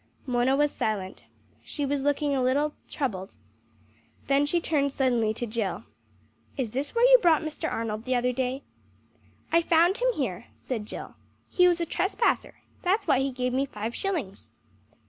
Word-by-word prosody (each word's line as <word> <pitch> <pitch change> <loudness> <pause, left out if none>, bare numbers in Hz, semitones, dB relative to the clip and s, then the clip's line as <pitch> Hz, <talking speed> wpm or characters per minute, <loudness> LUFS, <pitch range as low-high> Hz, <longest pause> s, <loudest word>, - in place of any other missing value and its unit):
Mona 250 0 +2
was 295 +1 +2
silent. 195 -3 -3 0.4
She 290 - -4
was 280 0 -1
looking 290 +1 +1
a 265 - +1
little 285 +4 +1 0.2
troubled. 195 -9 -3 0.9
Then 280 +1 +2
she 345 +4 +1
turned 285 -4 0
suddenly 245 -5 +1
to 240 - -3
Jill 220 -3 -3 0.7
"Is 250 -5 -2
this 275 - -3
where 470 +1 +5
you - - +8
brought 330 -6 +4
Mr. 315 +1 -4
Arnold 220 0 -3
the 255 0 0
other 250 +1 +1
day?" 260 +2 -2 0.9
"I 335 - +5
found 340 +4 +3
him - - +3
here," 235 -12 -3
said 220 -5 -5
Jill. - - -7 0.4
"He 360 -1 +5
was 350 -1 +2
a 340 - 0
trespasser. 385 +7 0 0.3
That's 385 +4 +1
why 260 - +3
he 270 +1 0
gave 250 0 -2
me 270 +2 +1
five 225 -2 -5
shillings." 300 - -4
275 Hz, 165 wpm, -27 LUFS, 240-320 Hz, 0.9 s, you